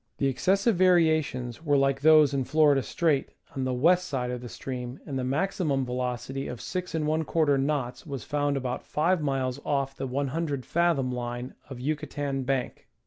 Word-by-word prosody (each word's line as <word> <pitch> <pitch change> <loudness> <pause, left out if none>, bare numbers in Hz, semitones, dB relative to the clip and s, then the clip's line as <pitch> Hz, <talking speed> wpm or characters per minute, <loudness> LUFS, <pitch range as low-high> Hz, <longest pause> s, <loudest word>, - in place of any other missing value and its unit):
The - - 0
excessive 195 - +2
variations 160 -8 +2
were 145 -3 +3
like 135 -1 +2
those 155 -2 +6
in 135 -1 +1
Florida 145 0 +4
Strait, 145 +3 0 0.3
on 135 -1 -1
the 130 - 0
west 180 +7 +3
side 125 -5 -2
of 125 -1 -4
the 120 - -8
stream, 125 +1 -6
and 135 -3 -3
the - - -2
maximum 145 -1 0
velocity 125 +2 -3
of 125 - -5
6:^ 160 -3 0
knots 135 -4 -2
was 135 -4 -5
found 145 -2 0
about 125 -2 -3
5 165 +3 +1
miles 135 -2 -1
off 135 -1 -1
the 135 - -4
100 140 +1 -2
fathom 165 -7 +1
line 120 0 -4 0.2
of 135 - -7
Yuca 145 +4 -3
tan 140 -2 -2
Bank. 130 -1 -2
140 Hz, 170 wpm, -27 LUFS, 130-155 Hz, 0.3 s, those